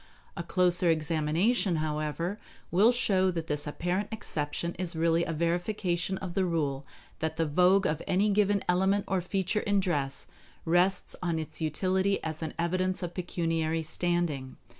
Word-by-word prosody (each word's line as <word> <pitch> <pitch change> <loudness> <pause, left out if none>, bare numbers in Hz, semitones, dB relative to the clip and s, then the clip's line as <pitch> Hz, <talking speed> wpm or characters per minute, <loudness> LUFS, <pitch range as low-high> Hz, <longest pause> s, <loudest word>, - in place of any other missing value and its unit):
A - - -3
closer 180 -1 +2
examination, 165 +6 +1
however, 155 +5 -2 0.3
will 205 +7 +5
show 195 -6 +2
that 165 -3 -3
this 150 -2 -2
apparent 180 +6 -1
exception 170 -5 -3
is 180 -2 -2
really 165 +1 +2
a - - -3
verification 175 +2 -1
of 185 -3 -6
the 190 0 +1
rule 145 -6 -1 0.3
that 160 0 -2
the 165 0 +1
vogue 180 +6 +4
of 155 +1 0
any 195 +3 +2
given 205 -1 +2
element 190 +3 +2
or 190 -2 0
feature 190 +3 -1
in 205 -1 +1
dress 145 -8 -1 0.4
rests 180 +3 +2
on 170 -2 0
its 160 +1 -4
utility 185 +5 +1
as 160 0 -4
an 160 -2 -4
evidence 185 +2 0
of 175 0 -4
pecuniary 165 -2 -1
standing. 160 -5 -2
175 Hz, 155 wpm, -29 LUFS, 160-190 Hz, 0.4 s, will